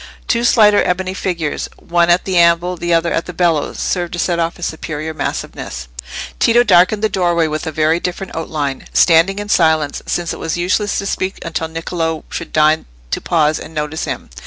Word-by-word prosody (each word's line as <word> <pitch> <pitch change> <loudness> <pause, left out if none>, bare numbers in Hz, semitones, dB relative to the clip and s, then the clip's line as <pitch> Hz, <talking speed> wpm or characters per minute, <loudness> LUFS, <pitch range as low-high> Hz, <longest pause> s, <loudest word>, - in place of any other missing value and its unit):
Two 235 0 +1
slighter 210 -4 +5
ebony 185 +1 -1
figures, 175 -5 -3
one 170 0 +1
at 175 +1 +3
the 190 - -2
anvil, 170 +1 +3
the 175 0 -3
other 170 0 +2
at 165 - -1
the 180 - -6
bellows, 165 -4 0
served 175 -2 -2
to - - -3
set 170 0 0
off 165 0 -1
his 175 - -4
superior 155 0 -4
massiveness. 60 - -5 0.5
Tito 240 +1 +5
darkened 205 0 +4
the - - +5
doorway 175 -4 +1
with 155 0 -3
a - - -2
very 155 +2 +2
different 180 +2 -5
outline, 150 -4 -3
standing 170 +3 +4
in 205 0 -4
silence, 160 -6 +2
since 175 -1 -1
it - - -8
was 165 +1 -2
useless 195 +4 0
to 200 - -2
speak 190 -1 -2
until 165 -1 -2
Niccolò 165 0 -3
should 170 - -5
deign 155 0 +3 0.2
to - - -1
pause 155 -2 +1
and 160 - -10
notice 150 +1 -2
him. - - -6
170 Hz, 195 wpm, -17 LUFS, 160-185 Hz, 0.5 s, slighter